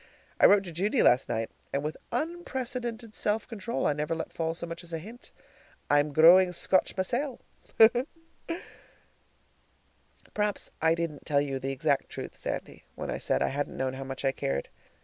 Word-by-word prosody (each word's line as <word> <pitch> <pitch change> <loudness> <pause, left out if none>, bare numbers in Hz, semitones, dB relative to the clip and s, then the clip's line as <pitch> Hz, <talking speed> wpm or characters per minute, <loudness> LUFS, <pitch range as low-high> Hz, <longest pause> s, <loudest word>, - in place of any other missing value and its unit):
I - - +9
wrote 200 -1 +5
to 180 - -8
Judy 200 - +1
last 125 +2 +4
night, 115 0 -2 0.2
and 140 - -1
with 155 +1 -3 0.2
unprecedented 250 -6 -3
self 210 0 0
control 230 0 -3
I - - +3
never 150 +3 -2
let 160 - -5
fall 165 0 -2
so 170 - -4
much 170 +1 -7
as 170 - -9
a 165 - -2
hint. 220 +9 -11 0.6
I'm 145 +1 +4
growing 180 +5 +7
Scotch 185 +3 +1
mysel'! 245 +8 -1 2.9
Perhaps 210 -1 -1
I 160 +1 +4
didn't 165 -4 -4
tell 145 -2 +3
you 135 -2 -2
the 135 +1 -3
exact 140 +1 0
truth, - - -7
Sandy, - - -5
when - - -4
I - - -3
said - - +1
I - - +1
hadn't 145 +1 -3
known 130 0 -1
how 135 +1 -5
much 135 +1 -5
I 135 - +4
cared. 70 - -3
165 Hz, 170 wpm, -29 LUFS, 145-210 Hz, 2.9 s, I